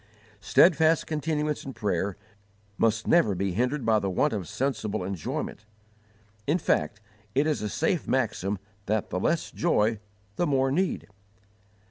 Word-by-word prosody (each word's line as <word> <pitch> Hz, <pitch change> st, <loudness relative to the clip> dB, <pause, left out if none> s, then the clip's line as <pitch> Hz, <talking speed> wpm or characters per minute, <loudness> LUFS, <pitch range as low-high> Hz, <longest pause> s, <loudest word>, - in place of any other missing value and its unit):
Steadfast 160 Hz, -, +4 dB
continuance 150 Hz, -1 st, -1 dB
in 135 Hz, -, -7 dB
prayer 100 Hz, -3 st, -1 dB, 0.6 s
must 115 Hz, +1 st, +1 dB
never 110 Hz, -, +4 dB
be 95 Hz, +1 st, -1 dB
hindered 125 Hz, +7 st, 0 dB
by 110 Hz, -1 st, +4 dB
the 100 Hz, -, -2 dB
want 90 Hz, -, +1 dB
of 100 Hz, -5 st, -3 dB
sensible 110 Hz, -4 st, -2 dB
enjoyment; 95 Hz, +2 st, -4 dB, 0.8 s
in 150 Hz, +5 st, +3 dB
fact, 105 Hz, -, 0 dB, 0.4 s
it 140 Hz, +3 st, +3 dB
is 155 Hz, -6 st, 0 dB
a 105 Hz, -, -2 dB
safe 160 Hz, -, 0 dB
maxim 105 Hz, -6 st, 0 dB, 0.3 s
that 110 Hz, 0 st, -1 dB
the 90 Hz, -, -1 dB
less 165 Hz, -, 0 dB
joy, 110 Hz, -10 st, +1 dB, 0.4 s
the 175 Hz, -, +1 dB
more 135 Hz, -2 st, +2 dB
need. 185 Hz, +6 st, 0 dB
115 Hz, 140 wpm, -27 LUFS, 105-150 Hz, 0.8 s, Steadfast